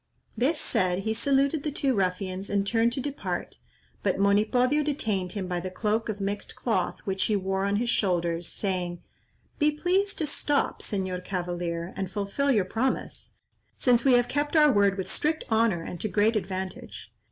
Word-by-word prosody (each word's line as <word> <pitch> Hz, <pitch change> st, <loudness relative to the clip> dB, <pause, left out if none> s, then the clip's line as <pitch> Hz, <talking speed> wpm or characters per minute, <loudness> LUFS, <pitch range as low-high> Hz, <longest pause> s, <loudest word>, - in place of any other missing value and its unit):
This 295 Hz, +6 st, +1 dB
said, 185 Hz, +1 st, 0 dB
he 220 Hz, -, 0 dB
saluted 275 Hz, +5 st, +2 dB
the 300 Hz, -, -2 dB
two 275 Hz, -2 st, +1 dB
ruffians 185 Hz, -1 st, -1 dB
and 200 Hz, -1 st, +1 dB
turned 230 Hz, +2 st, +2 dB
to 265 Hz, -, -2 dB
depart, 280 Hz, +1 st, -4 dB, 0.4 s
but -, -, +1 dB
Monipodio 220 Hz, +8 st, +3 dB
detained 215 Hz, -11 st, -1 dB
him 200 Hz, -3 st, -3 dB
by 180 Hz, -1 st, -2 dB
the 185 Hz, +2 st, -4 dB
cloak 215 Hz, +4 st, -1 dB
of 210 Hz, -1 st, -3 dB
mixed 200 Hz, +1 st, -3 dB
cloth 190 Hz, -7 st, -1 dB
which 190 Hz, -1 st, 0 dB
he 215 Hz, -, +1 dB
wore 195 Hz, 0 st, 0 dB
on 200 Hz, 0 st, +1 dB
his 235 Hz, +3 st, +1 dB
shoulders, 170 Hz, -4 st, 0 dB
saying: 180 Hz, -3 st, -3 dB, 0.6 s
"Be 300 Hz, -1 st, +4 dB
pleased 370 Hz, +6 st, 0 dB
to 315 Hz, -, 0 dB
stop, 290 Hz, 0 st, 0 dB
Señor 185 Hz, -3 st, -2 dB
cavalier, 175 Hz, -2 st, -3 dB
and 190 Hz, -2 st, -3 dB
fulfil 205 Hz, +8 st, -1 dB
your 210 Hz, -7 st, +3 dB
promise, 230 Hz, +7 st, -2 dB, 0.4 s
since 240 Hz, -2 st, +3 dB
we 270 Hz, -, +5 dB
have 245 Hz, 0 st, +4 dB
kept 290 Hz, +2 st, -1 dB
our 300 Hz, -2 st, +7 dB
word 200 Hz, -3 st, +3 dB
with 190 Hz, -, -3 dB
strict 310 Hz, +1 st, 0 dB
honour 220 Hz, -6 st, +2 dB
and 175 Hz, 0 st, -7 dB
to -, -, 0 dB
great 215 Hz, +3 st, +2 dB
advantage. 190 Hz, -2 st, -5 dB
205 Hz, 175 wpm, -27 LUFS, 185-260 Hz, 0.6 s, our